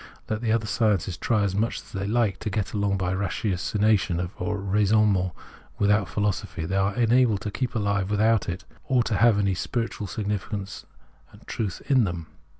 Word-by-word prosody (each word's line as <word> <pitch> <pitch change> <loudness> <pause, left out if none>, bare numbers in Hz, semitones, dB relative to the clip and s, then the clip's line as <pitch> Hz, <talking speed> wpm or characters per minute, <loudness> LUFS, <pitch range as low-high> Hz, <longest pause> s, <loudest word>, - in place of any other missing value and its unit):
Let 110 0 -2
the 115 -2 0
other 115 -1 +1
sciences 100 -4 +1
try 110 +3 +1
as 100 -2 0
much 110 +4 0
as - - -15
they 95 0 -3
hke 110 -2 +1
to 110 - -4
get 100 0 -2
along 100 -2 +1
by 90 -1 -1
ratiocination 100 -1 0
or 105 -1 -1
raisonnement 100 -1 +2 0.5
without 105 -2 +2
philosophy, 100 -3 -2
they 95 - -2
are 95 +1 +1
unable 120 -2 +3
to 105 +2 -5
keep 125 +3 -3
alive 100 -3 0
without 110 0 +2
it, 90 +1 -5 0.2
or 130 -3 +2
to 115 - -1
have 115 -2 +5
any 100 -2 +2
spiritual 115 +2 -3
significance 100 0 -4 0.4
and - - -17
truth 100 -5 -4
in 130 -5 +4
them. 85 -3 -4
105 Hz, 175 wpm, -25 LUFS, 95-110 Hz, 0.5 s, have